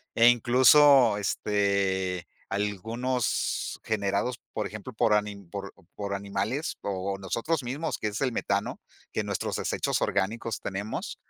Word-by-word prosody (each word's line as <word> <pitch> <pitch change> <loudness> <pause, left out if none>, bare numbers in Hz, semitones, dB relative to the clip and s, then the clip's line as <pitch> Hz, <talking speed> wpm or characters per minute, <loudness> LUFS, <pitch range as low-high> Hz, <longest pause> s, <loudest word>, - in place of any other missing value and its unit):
e, 115 +1 +7
incluso, 125 0 +6
este, 100 -3 0 0.2
algunos 110 +5 -1
generados, 105 +3 -1
por 105 - -2
ejemplo, 105 +4 -8
por 110 -1 +3
ani 105 -1 +1
por 100 +2 -6 0.2
por 100 -1 -3
animales, 100 +9 -2
o, 95 0 -2
nosotros 125 +9 -1
mismos, 145 +7 -3
que 105 - -2
es 105 +5 -4
el 130 -2 +1
metano, 100 -2 -1 0.3
que - - -1
en - - -6
nuestros - - -2
desechos - - -1
orgánicos 110 +4 -1
tenemos 100 +2 -4
105 Hz, 135 wpm, -28 LUFS, 100-120 Hz, 0.3 s, e